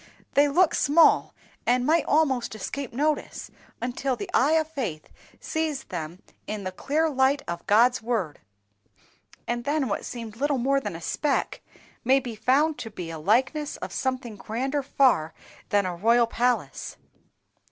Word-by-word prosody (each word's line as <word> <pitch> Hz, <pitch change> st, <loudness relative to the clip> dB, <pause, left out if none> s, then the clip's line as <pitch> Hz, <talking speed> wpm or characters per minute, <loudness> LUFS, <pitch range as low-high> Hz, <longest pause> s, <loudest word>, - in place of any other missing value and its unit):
"They 285 Hz, +1 st, +5 dB
look 335 Hz, +4 st, +3 dB
small, 310 Hz, +4 st, +4 dB, 0.3 s
and 245 Hz, +1 st, +2 dB
might 320 Hz, +2 st, +3 dB
almost 270 Hz, -7 st, +1 dB
escape 265 Hz, +5 st, -5 dB
notice, 295 Hz, +4 st, -2 dB, 0.3 s
until 250 Hz, +2 st, -2 dB
the 380 Hz, +7 st, -7 dB
eye 285 Hz, +5 st, +4 dB
of 320 Hz, -1 st, +2 dB
faith 225 Hz, -, -5 dB, 0.3 s
sees 315 Hz, -3 st, -2 dB
them 175 Hz, +2 st, -7 dB, 0.2 s
in 210 Hz, -1 st, -4 dB
the 185 Hz, -, -3 dB
clear 310 Hz, +10 st, 0 dB
light 275 Hz, -1 st, +2 dB
of 170 Hz, 0 st, -5 dB
God's 240 Hz, +5 st, +4 dB
Word, 220 Hz, -10 st, -2 dB, 1.1 s
and 240 Hz, 0 st, -2 dB
then 290 Hz, 0 st, 0 dB
what 200 Hz, -, -2 dB
seemed 225 Hz, -3 st, -7 dB
little 285 Hz, +2 st, +1 dB
more 275 Hz, +3 st, +2 dB
than 270 Hz, -, -5 dB
a 165 Hz, -, -8 dB
speck, 285 Hz, -, -1 dB, 0.4 s
may 265 Hz, +3 st, +4 dB
be 245 Hz, -3 st, -6 dB
found 275 Hz, +8 st, +2 dB
to 225 Hz, -, -6 dB
be 175 Hz, -5 st, -7 dB
a 160 Hz, -, -6 dB
likeness 260 Hz, -, +1 dB
of -, -, -7 dB
something 255 Hz, -5 st, -3 dB
grander 265 Hz, +8 st, -2 dB
far 255 Hz, -, +2 dB, 0.3 s
than 205 Hz, -1 st, +2 dB
a 180 Hz, -1 st, -3 dB
royal 230 Hz, +6 st, +4 dB
palace." 245 Hz, +2 st, -1 dB
255 Hz, 155 wpm, -26 LUFS, 220-285 Hz, 1.1 s, They